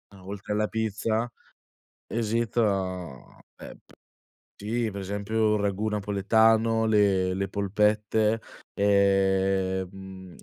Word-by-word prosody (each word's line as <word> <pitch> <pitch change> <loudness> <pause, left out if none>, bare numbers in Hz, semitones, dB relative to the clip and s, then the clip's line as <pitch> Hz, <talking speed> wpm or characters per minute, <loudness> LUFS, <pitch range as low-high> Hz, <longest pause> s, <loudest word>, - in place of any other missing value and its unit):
No 95 -1 -15
oltre 100 +1 -5
alla 105 0 +1
pizza, 110 +1 -1 0.8
esita 105 - -2 0.2
ehm, - - -10
p - - -22 0.7
sì 115 +2 -1
per 100 0 -6
esempio 105 +3 0
il 105 - 0
ragù 100 +2 -1
napoletano, 110 +2 +2
le 100 -4 +3
le 95 +1 -2
polpette, 105 +2 +1 0.4
ehm, 95 -1 +2
mhmm, 95 -2 -11
100 Hz, 105 wpm, -26 LUFS, 95-110 Hz, 0.8 s, le